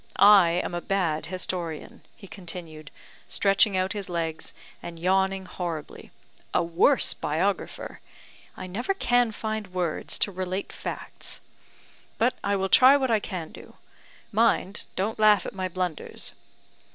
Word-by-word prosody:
I 200 -5 +7
am - - -4
a 175 - -2
bad 170 -6 -1
historian," 180 +4 -5
he 215 - -13
continued, 165 -5 -8 0.4
stretching 195 0 +3
out 185 +3 0
his 200 -3 -5
legs 165 -2 -3 0.3
and 170 -1 -8
yawning 190 +2 +1
horribly, 175 -4 -6 0.5
"a - - +4
worse 170 +11 +3
biographer. 180 +7 -2 0.6
I - - -6
never 240 - -2
can 245 -9 +2
find 215 -1 -4
words 175 -4 -1
to 200 - +1
relate 185 +1 -4
facts. - - -6 0.8
But 245 +3 +3
I 200 0 +1
will 190 -1 0
try 260 +7 +7
what 260 -3 0
I 220 - +4
can 180 -6 -6
do; - - -13 0.6
mind, 215 -3 +1
don't 210 +4 -2
laugh 215 -1 +5
at - - -5
my 190 -1 -2
blunders." 180 -3 -3
190 Hz, 140 wpm, -26 LUFS, 175-210 Hz, 0.8 s, I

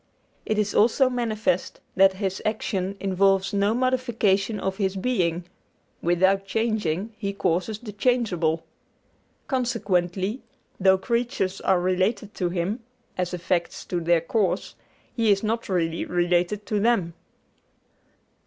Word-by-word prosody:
It 215 - 0
is 210 -1 0
also 250 +4 +4
manifest 220 -6 -1 0.2
that 195 0 +6
His 190 -1 -3
action 200 -3 -2
involves 195 0 +2
no 200 +2 +2
modification 230 -5 +1
of 190 0 -2
His 195 -2 0
being 185 -6 0 0.6
without 190 +3 +2
changing, 215 -3 -1
He 200 -2 -2
causes 190 +3 -1
the 215 -1 -8
changeable. 195 -8 0 0.8
Consequently, 210 - -1 0.4
though 190 0 +5
creatures 235 -2 -1
are 190 -2 +3
related 185 +4 0
to 180 -2 -1
Him, 180 +6 -2 0.4
as 180 -1 -2
effects 175 -1 -2
to 175 - -2
their 170 0 +2
cause, 195 +4 -1 0.4
He 225 -3 +3
is 195 +1 +2
not 225 +1 -2
really 170 -3 0
related 175 +3 0
to 210 0 0
them. 200 -6 +1
195 Hz, 125 wpm, -25 LUFS, 180-220 Hz, 0.8 s, that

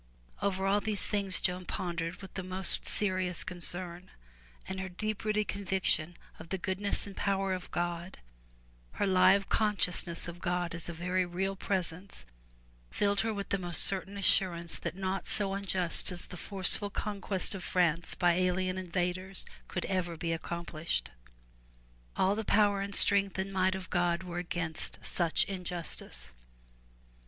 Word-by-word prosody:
Over 195 -1 0
all 200 +1 +3
these 210 -1 -1
things 200 -3 0
Joan 180 0 0
pondered 175 +1 -3
with 195 - -10
the 190 - -3
most 185 0 0
serious 185 -3 +2
306 175 -2 -2
FROM 175 - -4
THE - - -3
TOWER 170 - -8
WINDOW 185 - -21
concern, - - -23 0.5
and 190 0 -4
her 190 0 -4
deep 215 +4 -3
rooted 215 -1 +1
conviction 190 -4 +1 0.2
of 160 - -10
the 190 - -1
goodness 190 +2 0
and 200 -1 -9
power 195 -1 0
of 185 -1 -5
God, 175 +1 -3 0.8
her - - 0
Hve 190 +1 +5
consciousness 180 -5 0
of 175 +1 -8
God 175 -1 -1
as 170 0 -4
a - - -4
very 180 +3 0
real 190 +2 -2
presence, 185 -1 -3 0.6
filled 200 -1 +1
her 225 - +1
with 200 -2 -4
the 200 - +1
most 175 -3 +1
certain 195 +1 -2
assurance 175 -3 +3
that 170 -1 -4
naught 190 0 -2
so 200 -2 +5
unjust 190 -3 0
as 175 0 -6
the - - -10
forceful 195 +2 +4
conquest 200 -2 -1
of 190 -2 -6
France 170 -2 +1
by 175 -1 +3
alien 185 +1 +1
invaders 185 +1 -2 0.2
could 175 - -3
ever 175 -3 -1
be 165 +1 -1
accomplished. 165 - -3 1.0
All 190 +1 +3
the 220 +2 -2
power 205 -1 +3
and 200 0 -3
strength 200 -1 +4
and 190 +1 -3
might 185 0 +2
of 190 -1 -7
God 175 0 +1
were 175 -1 -4
against 175 -2 -3
such 170 -3 +2
injustice. 180 - -5
185 Hz, 165 wpm, -31 LUFS, 175-195 Hz, 1.0 s, Hve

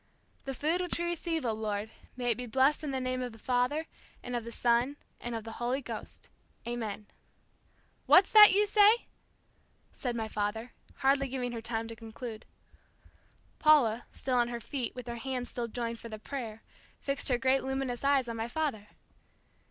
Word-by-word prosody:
"The 270 -1 -3
food 320 +7 +1
which 360 - -1
we 345 - -1
receive, 335 -3 -2
O 230 - +2
Lord, 215 0 -3 0.3
may 245 -1 +1
it - - +1
be 250 +2 -6
blessed 270 +6 +3
in 300 - -2
the 265 -1 -1
name 255 0 -2
of 250 -2 -4
the - - -12
Father, 250 +7 0 0.4
and 245 0 -4
of 235 -1 -3
the 235 - -6
Son, 240 +4 +2 0.2
and 240 -1 -4
of 225 - -4
the 225 0 -8
Holy 245 +3 0
Ghost. 275 - -8 0.4
Amen." 220 -3 -4 1.0
"What's 375 +1 +7
that 425 -1 +10
you 410 +2 +4
say?" 420 +2 +5 0.9
said 245 -3 -3
my 225 -1 -2
father, 215 +3 -3 0.2
hardly 275 0 +2
giving 250 -1 -3
her 230 -1 -5
time 225 0 -3
to 230 - -6
conclude. 225 0 -8 1.1
Paula, 255 -7 +4
still 255 -2 -1
on 240 -1 +3
her 240 0 -4
feet, 250 0 -4
with 250 -2 -6
her 235 0 -4
hands 250 0 -4
still 240 -1 -3
joined 230 0 -4
for 230 - -9
the 215 - -6
prayer, 225 -2 -6 0.4
fixed 275 0 -2
her 250 - +3
great 265 +1 +2
luminous 265 -2 -2
eyes 275 -2 +3
on 230 - -4
my 225 0 -2
father. 240 -6 -2
245 Hz, 185 wpm, -31 LUFS, 230-275 Hz, 1.1 s, that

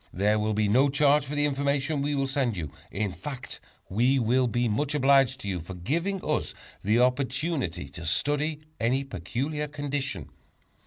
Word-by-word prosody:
There 105 +3 +2
will 105 0 0
be 105 0 +2
no 130 +7 +4
charge 145 +1 +4
for 150 - -3
the 145 0 +2
information 140 +1 0
we 145 +1 0
will 135 -1 +1
send 135 -6 0
you; 80 -5 -4 0.2
in 100 0 -2
fact, 135 +5 -7 0.3
we 125 +7 +2
will 125 +1 +2
be 120 +1 +1
much 145 +7 0
obliged 135 -2 +4
to - - -6
you 95 -2 -1
for 85 +3 -8
giving 170 - -2
us - - -1 0.3
the 105 +3 +2
opportunity 125 - 0
to 85 +4 -8
study 145 - +1 0.2
any 125 +4 +1
peculiar 135 - -3
condition. 145 -1 -3
135 Hz, 170 wpm, -27 LUFS, 110-145 Hz, 0.3 s, no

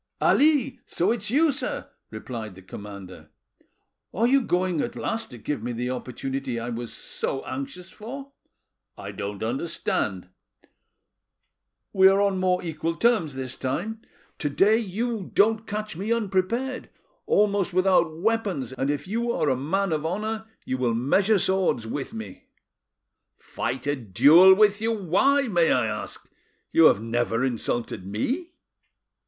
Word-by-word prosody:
"Ali! 285 -3 +3
so 180 +5 +1
it's 215 -3 -2
you, 300 +6 +4
sir," 280 - -3 0.2
replied 110 -6 -7
the 95 - -14
commander. 100 0 -10 0.8
"Are 225 +5 +1
you 270 +3 +4
going 180 - 0
at - - -4
last 225 0 -3
to 125 - -10
give 130 +2 -4
me 120 +2 -3
the 125 +2 -2
opportunity 130 0 -4
I 115 +1 -4
was 120 0 -5
so 135 - -4
anxious 140 +8 -6
for?" 270 +6 -8 0.7
"I - - -7
don't 100 0 -5
understand." 110 - -2 1.6
"We 190 -1 +7
are 195 +1 +4
on 200 -2 +2
more 185 -1 +1
equal 165 0 -3
terms 180 - +2
this 130 -1 -4
time; 190 +13 -3 0.4
to 145 - -1
day 205 +10 +4
you 225 0 -3
don't 220 +2 +3
catch 210 -2 -4
me 200 +6 -3
unprepared, 230 +4 -1 0.4
almost 205 -2 +2
without 180 -3 +2
weapons, 195 - -1
and 135 +2 -2
if 145 +4 -2
you 235 +4 -1
are 150 - 0
a - - +2
man 170 +9 -1
of 155 -1 -1
honour 215 +6 -3 0.2
you 130 - -2
will 120 -3 +1
measure 195 - +3
swords 190 - +1
with 135 +4 -4
me." 110 -4 -9 0.9
"Fight 125 +2 -4
a 145 0 +1
duel 145 - +6
with 210 0 +4
you! 225 +1 +1
why, 220 - +2
may 175 -6 +3
I 125 -2 +3
ask? 105 -1 -5 0.4
You 165 - +6
have 105 - +5
never 115 +1 0
insulted 120 -4 -2
me." 265 - -2
175 Hz, 150 wpm, -25 LUFS, 125-215 Hz, 1.6 s, We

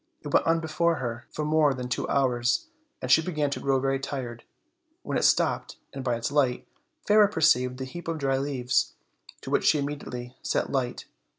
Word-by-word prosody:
It 145 - -5
went - - +4
on 165 0 +3
before 165 +1 +1
her 120 -4 -5
for 150 - -4
more 150 -2 +3
than 125 -1 -5
two 125 - -2
hours, 125 - +1 0.4
and 130 - -1
she 160 - +7
began 155 -4 -1
to - - -2
grow 135 -1 +1
very 135 0 0
tired, 125 -4 -5 0.6
when - - -3
it - - +1
stopped, - - +2 0.2
and, 135 -1 -5
by 125 -2 0
its 115 +3 -3
light, 135 -4 +1 0.4
Fairer 210 0 +6
perceived 130 -9 +2
the 130 - -4
heap 175 +7 -9
of 165 -1 -2
dry 135 -2 0
leaves, 130 -3 0 0.5
to - - -7
which - - +2
she - - +5
immediately 135 -4 -5
set - - -1
light. 130 -3 -2
135 Hz, 195 wpm, -27 LUFS, 125-155 Hz, 0.6 s, she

